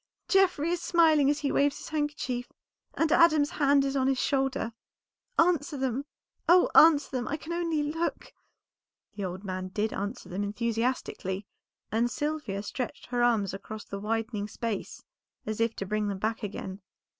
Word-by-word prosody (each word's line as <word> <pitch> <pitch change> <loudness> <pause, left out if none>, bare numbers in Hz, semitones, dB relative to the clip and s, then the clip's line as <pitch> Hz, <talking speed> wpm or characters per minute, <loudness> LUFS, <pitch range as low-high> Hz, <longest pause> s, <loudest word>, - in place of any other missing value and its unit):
Geoffrey 360 -5 +3
is 350 -1 -1
smiling 315 -6 +4
as 295 +1 0
he 280 - 0
waves 285 0 +2
his - - -9
handkerchief, 295 -5 -2 0.4
and 320 -1 +1
Adam's 310 -3 +5
hand 280 -1 +3
is 275 0 -1
on 265 -1 +2
his 270 -1 +2
shoulder. 270 -4 0 0.6
Answer 330 -3 +2
them! 265 +1 -1 0.4
oh, 355 +1 +6
answer 305 -3 +7
them! 250 -2 -2
I 300 - -2
can 320 +2 -6
only 335 -3 0
look." 325 +3 -3 0.8
The 200 -1 -4
old 185 +2 -5
man 185 -1 -4
did 210 +3 -2
answer 205 +1 -4
them 190 +2 -4
enthusiastically, 215 -2 -2 0.5
and 230 +2 +2
Sylvia 295 -9 -3
stretched 245 +3 -5
her 245 -1 0
arms 225 -6 +2
across 210 +2 -7
the 200 - -6
widening 220 0 -2
space 220 -1 -4 0.4
as 215 +1 -3
if 230 0 +1
to 195 - -4
bring 210 +1 -1
them 200 -1 -2
back 220 +3 -2
again. 200 -2 -6
250 Hz, 165 wpm, -28 LUFS, 210-295 Hz, 0.8 s, answer